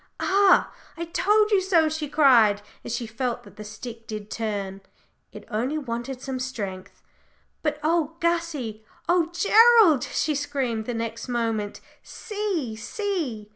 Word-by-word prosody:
"Ah! 390 -1 +4 0.2
I 335 - -3
told 420 +5 +2
you 400 -2 +4
so," 350 -4 +3
she 310 -1 -3
cried, 235 -9 +5 0.2
as 230 - -3
she 240 - -3
felt 240 +2 -3
that - - -16
the 210 - -8
stick 225 +2 -9
did 215 -1 -7
turn, 200 -3 -3 0.5
"it - - -11
only 250 +8 -1
wanted 250 -1 -5
some 265 -1 -4
strength. 200 -8 -6 0.6
But 300 -1 -1
oh, 325 0 +1
Gussie! 330 -11 -1 0.2
oh, 345 -1 +2
Gerald!" 415 - +6
she 310 - -1
screamed 270 -6 -2
the 245 - -2
next 230 +1 -4
moment, 225 -4 -2 0.2
"see, 395 - -4
see!" 265 - -4
260 Hz, 140 wpm, -25 LUFS, 225-335 Hz, 0.6 s, Gerald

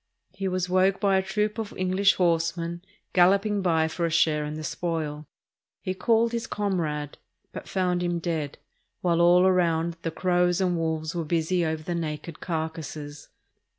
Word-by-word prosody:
He 190 0 -3
was 185 -1 -1
woke 185 +1 +2
by 195 -1 +3
a - - +3
troop 210 +3 -1
of 220 -2 -4
English 185 +2 +3
horse 170 -1 +1
men 170 +1 -4 0.3
galloping 200 +3 +4
by 165 -3 +2
for 170 +2 -4
a 170 - +2
share 155 -2 +2
in 150 +1 -5
the 155 - -6
spoil. 155 -2 -3 0.5
He 185 - -3
called 230 +4 +2
his 235 -1 -3
comrade, 160 -8 -2 0.3
but - - -8
found 180 -2 0
him 175 -1 0
dead, 160 -4 -3 0.4
while 170 -1 +2
all 175 +2 +6
round 170 -2 +1
the 165 - -2
crows 175 +1 +1
and 180 -2 +1
wolves 160 -1 -2
were 170 -2 -2
busy 170 +2 0
over 160 -1 -2
the 175 - -3
naked 160 -1 -4
carcasses. 155 -3 -5
170 Hz, 170 wpm, -26 LUFS, 160-185 Hz, 0.5 s, all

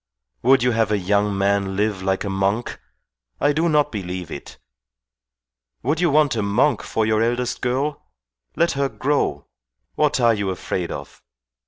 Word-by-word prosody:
Would 130 0 +4
you 125 - +3
have 115 -2 +1
a 105 - +3
young 100 +1 +1
man 100 0 +1
live 105 -1 0
like 95 0 0
a 100 - -3
monk? 100 +4 -1 0.6
I 145 - +3
do 165 +3 +1
not 150 -1 +2
believe 90 -4 -5
it. 70 - -8 1.3
Would 150 +7 0
you 175 - +3
want 150 -3 +3
a 110 - 0
monk 105 +9 +2
for 110 - -1
your 110 0 +2
eldest 120 +1 -1
girl? 135 +4 -2 0.5
Let 170 - +2
her 140 0 0
grow. 135 - -1 0.5
What 150 -2 +1
are 120 -2 +4
you 100 -2 -2
afraid 90 -1 -3
of? - - -8
110 Hz, 165 wpm, -22 LUFS, 100-140 Hz, 1.3 s, Would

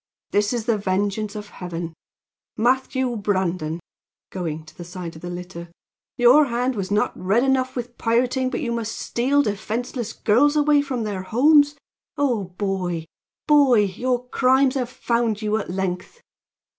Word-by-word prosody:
This 205 0 +2
is 235 -3 -2
the 230 -3 +1
vengeance 200 +2 -1
of 210 -1 -7
heaven! 170 -2 -6 0.6
Matthew 260 +1 +1
Brandon!" 185 -6 -1 0.5
going 160 -4 -4
to 155 +1 -16
the 175 - -8
side 175 -1 -7
of 160 - -11
the 175 - -6
litter, 175 -1 -7 0.5
"your 250 +5 +6
hand 250 +1 0
was 195 -4 -4
not 205 0 +1
red 200 +7 +1
enough 260 -1 +1
with 245 -1 -6
pirating, 250 +3 +1
but - - -3
you 235 - -2
must 230 -1 -3
steal 275 +4 +1
defenseless 225 +2 -3
girls 280 +8 +3
away 295 -1 +4
from 260 -5 -3
their 205 -3 -3
homes! 290 +8 +4 0.4
Oh, 250 -8 +1
boy! 180 -3 -3 0.4
boy 280 -7 +5
your 245 +6 -1
crimes 260 +1 +3
have 255 -3 -2
found 235 -3 -1
you 215 0 +1
at 220 - -4
length!" 185 - -3
225 Hz, 155 wpm, -23 LUFS, 190-255 Hz, 0.6 s, your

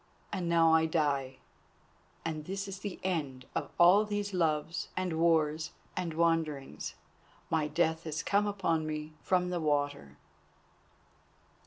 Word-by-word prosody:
And 180 -4 -1
now 165 -1 +5
I 160 0 +4
die, 140 -5 0 0.9
and 155 -2 -3
this 195 +2 -4
is 195 -1 -6
the 200 -2 -5
end 145 -9 -2
of - - -2
all 180 +5 +7
these 205 -1 -3
Loves 160 -2 0
and 180 -3 -1
Wars 155 -2 +2 0.2
and 170 -3 -3
Wanderings. 160 - 0 0.6
My 160 -2 +2
death 160 +1 0
has 155 -1 -3
come 205 +1 +2
upon 165 -6 0
me 155 0 -4
from 180 -1 +1
the 175 - -1
water." 145 - -1
165 Hz, 135 wpm, -31 LUFS, 150-180 Hz, 0.9 s, all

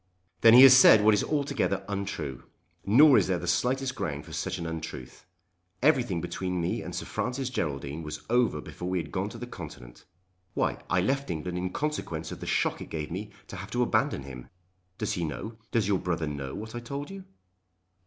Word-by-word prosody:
"Then 115 0 +8
he 125 - +10
has 130 -1 +10
said 110 -4 +8
what 110 0 +6
is 105 - +2
altogether 140 -10 -1
untrue. 95 -10 -4 0.4
Nor 135 +7 +7
is - - 0
there 95 -2 +1
the 85 - -6
slightest 125 +8 0
ground 75 - -4
for 80 - -11
such 90 +3 -3
an 85 - -5
untruth. 80 -6 -7 0.6
Everything 125 - +3
between 90 +1 -3
me 85 - -1
and - - -7
Sir - - -4
Francis 125 +1 -3
Geraldine 70 - -3
was 75 -1 -7
over 120 0 +2
before 90 - -7
we 95 - 0
had 85 - -4
gone 100 +2 -2
to 115 - -9
the 120 - -6
Continent. 70 - -10 0.5
Why; - - 0
I 90 0 +2
left 135 +8 -1
England 90 +2 -3
in 90 +1 -2
consequence 90 - -3
of - - -7
the - - -7
shock - - 0
it - - -8
gave 75 -1 -5
me 100 +5 -5 0.2
to 100 - -9
have 95 +3 -8
to 120 +3 +1
abandon 70 - 0
him. 65 -2 -10 0.5
Does 105 0 -2
he 90 -5 -2
know, 110 +8 -5
does 110 -4 +1
your 100 -3 +2
brother 85 -3 -2
know 70 -3 -5
what 110 +1 -7
I 120 - -4
told 140 +7 -6
you?" 195 -1 -9
95 Hz, 205 wpm, -28 LUFS, 80-120 Hz, 0.6 s, he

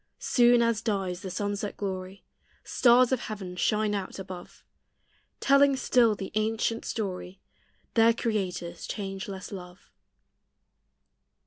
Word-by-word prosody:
Soon 240 -1 +4
as 230 -2 +1
dies 190 -5 -2
the 190 - -5
sunset 205 +2 -3
glory, 190 -1 -5 0.4
Stars 245 0 +4
of 260 - +2
heaven 195 -6 -6
shine 210 +3 +1
out 195 -2 -4
above, 185 -2 -9 0.8
Telling 275 0 +5
still 240 -4 +3
the 195 -2 -6
ancient 225 +2 0
story 190 -3 -4 0.5
Their 230 0 +6
Creator's 200 -7 -3
changeless 195 -1 -5
love. 180 -2 -10
205 Hz, 110 wpm, -28 LUFS, 190-230 Hz, 0.8 s, Their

